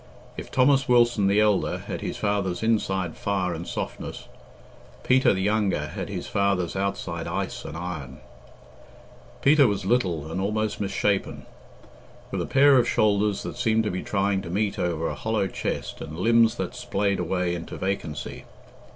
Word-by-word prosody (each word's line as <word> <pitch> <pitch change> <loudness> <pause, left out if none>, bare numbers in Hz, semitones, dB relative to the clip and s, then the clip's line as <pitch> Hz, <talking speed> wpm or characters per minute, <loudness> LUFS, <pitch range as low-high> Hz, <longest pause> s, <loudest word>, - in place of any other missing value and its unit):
If - - -7
Thomas 135 +1 +3
Wilson 120 -4 +4
the 100 +2 +3
elder 105 -2 +2
had - - -6
his - - -4
father's 100 -2 -1
inside 95 -6 0
fire 95 -3 -1
and 85 +1 -6
softness, - - -5 0.8
Peter, 130 +1 +4
the 95 -1 -1
younger, 105 -1 +1
had - - -5
his - - -4
father's 100 -4 0
outside 100 +1 -3
ice - - -3
and 75 - -6
iron. 80 -7 -6 1.3
Peter 140 -1 +6
was 100 -3 -2
little 90 - 0
and 95 - -2
almost 105 +1 -1
misshapen, 100 0 -1 0.9
with - - -2
a - - -3
pair 140 -1 +6
of 120 - +1
shoulders 105 -1 +2
that - - -6
seemed 110 -2 +2
to 105 - -1
be 90 - -3
trying 100 -1 0
to 95 - -8
meet 100 +3 -1
over 85 -2 -1
a - - -2
hollow 110 -2 -1
chest 95 - -4
and 75 - -7
limbs 115 +3 +4
that - - -4
splayed 105 -5 -1
away 90 -2 0
into 85 -1 -6
vacancy. 85 -7 -4
100 Hz, 160 wpm, -25 LUFS, 90-110 Hz, 1.3 s, Peter